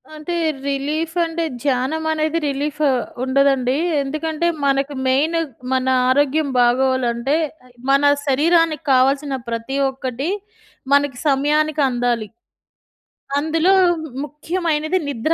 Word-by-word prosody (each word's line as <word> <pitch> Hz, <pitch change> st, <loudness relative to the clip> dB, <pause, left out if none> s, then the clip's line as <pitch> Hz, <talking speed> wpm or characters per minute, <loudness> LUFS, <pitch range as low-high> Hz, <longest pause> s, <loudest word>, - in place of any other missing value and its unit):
అంటే 310 Hz, +3 st, -5 dB, 0.3 s
రిలీఫ్ 300 Hz, +4 st, -2 dB
అంటే, 330 Hz, 0 st, -2 dB, 0.2 s
ధ్యానం 275 Hz, +3 st, 0 dB
అనేది 315 Hz, +1 st, 0 dB
రిలీఫ్ 290 Hz, +2 st, -3 dB, 0.4 s
ఉండదండి. 265 Hz, -1 st, +2 dB, 0.3 s
ఎందుకంటే, 310 Hz, +4 st, -2 dB, 0.2 s
మనకు 275 Hz, +1 st, +1 dB
మెయిన్ 290 Hz, +6 st, +2 dB, 0.4 s
మన 260 Hz, 0 st, +1 dB, 0.2 s
ఆరోగ్యం 285 Hz, +3 st, +2 dB
బాగోవాలంటే, 250 Hz, +1 st, +2 dB, 0.5 s
మన 275 Hz, +1 st, +4 dB, 0.2 s
శరీరానికి 315 Hz, +2 st, +2 dB
కావాల్సిన 275 Hz, +2 st, +2 dB
ప్రతి 230 Hz, +4 st, -3 dB
ఒక్కటి 265 Hz, +3 st, -4 dB, 0.6 s
మనకి 285 Hz, -2 st, +2 dB
సమయానికి 300 Hz, +2 st, +2 dB
అందాలి. 240 Hz, -3 st, -1 dB, 1.1 s
అందులో 320 Hz, +5 st, +2 dB, 0.5 s
ముఖ్యమైనది 315 Hz, +2 st, -1 dB
నిద్ర. 285 Hz, +4 st, 0 dB
285 Hz, 95 wpm, -20 LUFS, 260-310 Hz, 1.1 s, మన